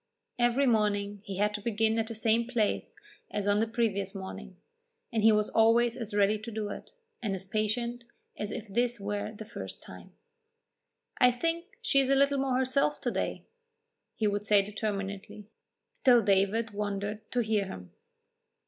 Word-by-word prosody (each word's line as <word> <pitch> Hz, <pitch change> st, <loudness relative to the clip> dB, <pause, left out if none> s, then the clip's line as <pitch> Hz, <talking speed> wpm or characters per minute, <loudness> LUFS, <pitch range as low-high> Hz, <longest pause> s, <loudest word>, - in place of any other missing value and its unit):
Every 240 Hz, +3 st, +3 dB
morning 205 Hz, -4 st, +1 dB
he 195 Hz, -2 st, -5 dB
had 210 Hz, +1 st, +1 dB
to 210 Hz, -, -4 dB
begin 225 Hz, +1 st, +1 dB
at 225 Hz, -, -1 dB
the 230 Hz, -, -5 dB
same 225 Hz, +1 st, +2 dB
place 230 Hz, -4 st, -1 dB, 0.3 s
as 205 Hz, -1 st, -2 dB
on 205 Hz, 0 st, +3 dB
the 225 Hz, -, +2 dB
previous 205 Hz, -4 st, -1 dB
morning, 195 Hz, 0 st, -8 dB, 0.6 s
and 225 Hz, -, +1 dB
he 220 Hz, +1 st, +7 dB
was 210 Hz, -1 st, +2 dB
always 230 Hz, +1 st, +4 dB
as 225 Hz, -4 st, -5 dB
ready 205 Hz, +1 st, +3 dB
to 220 Hz, +2 st, -7 dB
do 215 Hz, -2 st, -3 dB
it, -, -, -7 dB, 0.3 s
and 205 Hz, -5 st, -1 dB
as 190 Hz, 0 st, -7 dB
patient, 235 Hz, +4 st, -1 dB, 0.3 s
as 210 Hz, 0 st, -4 dB
if 220 Hz, 0 st, -5 dB
this 240 Hz, +3 st, 0 dB
were 205 Hz, +1 st, -3 dB
the 220 Hz, 0 st, -9 dB
first -, -, -7 dB
time. -, -, -12 dB, 1.1 s
"I 250 Hz, -, +7 dB
think 330 Hz, +7 st, -1 dB, 0.2 s
she 280 Hz, -10 st, +3 dB
is 270 Hz, -1 st, +2 dB
a 275 Hz, -, +5 dB
little 280 Hz, 0 st, +3 dB
more 265 Hz, -2 st, +1 dB
herself 265 Hz, +3 st, +1 dB
to -, -, -1 dB
day," -, -, -2 dB, 0.7 s
he 220 Hz, -, -1 dB
would 205 Hz, 0 st, 0 dB
say 205 Hz, -1 st, +5 dB
determinedly, 200 Hz, -1 st, -4 dB, 0.6 s
till 245 Hz, -4 st, +6 dB
David 200 Hz, +3 st, +2 dB
wondered 205 Hz, +1 st, -3 dB
to 245 Hz, -, +2 dB
hear 215 Hz, -3 st, +1 dB
him. 90 Hz, -, -9 dB
215 Hz, 175 wpm, -30 LUFS, 205-235 Hz, 1.1 s, he